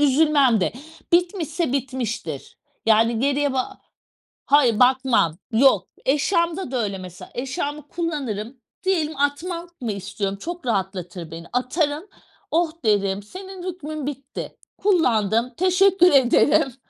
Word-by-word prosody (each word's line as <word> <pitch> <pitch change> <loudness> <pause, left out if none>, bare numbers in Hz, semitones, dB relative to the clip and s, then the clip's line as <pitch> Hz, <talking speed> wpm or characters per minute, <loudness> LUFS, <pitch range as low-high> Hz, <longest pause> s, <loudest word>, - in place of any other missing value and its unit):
üzülmem 280 -5 +4
de. - - 0 0.4
Bitmişse 345 -4 +1
bitmiştir. 235 - -4 0.3
Yani, 225 +1 +4
geriye 285 +1 +1
ba 265 +10 -3 0.7
Hayır, 260 -7 +4
bakmam. 250 -10 +3
Yok 260 +4 +4 0.2
eşyamda 335 +3 +1
da 255 -3 0
öyle 200 -2 -3
mesela; 185 -1 -10
eşyamı 285 +3 -4
kullanırım 270 - -3 0.3
diyelim 320 -5 0
atmak 335 +4 -2
mı 235 -4 -2
istiyorum, 200 0 -4
çok 345 - -6
rahatlatır 185 -5 -3
beni, 165 +1 -8
atarım. 290 +5 0 0.5
Oh 330 -1 +1
derim, 200 -2 +1
senin 375 - -9
hükmün 310 -4 -6
bitti, 280 -1 -6 0.2
kullandım 240 - +2
teşekkür 370 0 +4
ederim. 265 0 +4
270 Hz, 115 wpm, -23 LUFS, 220-325 Hz, 0.7 s, üzülmem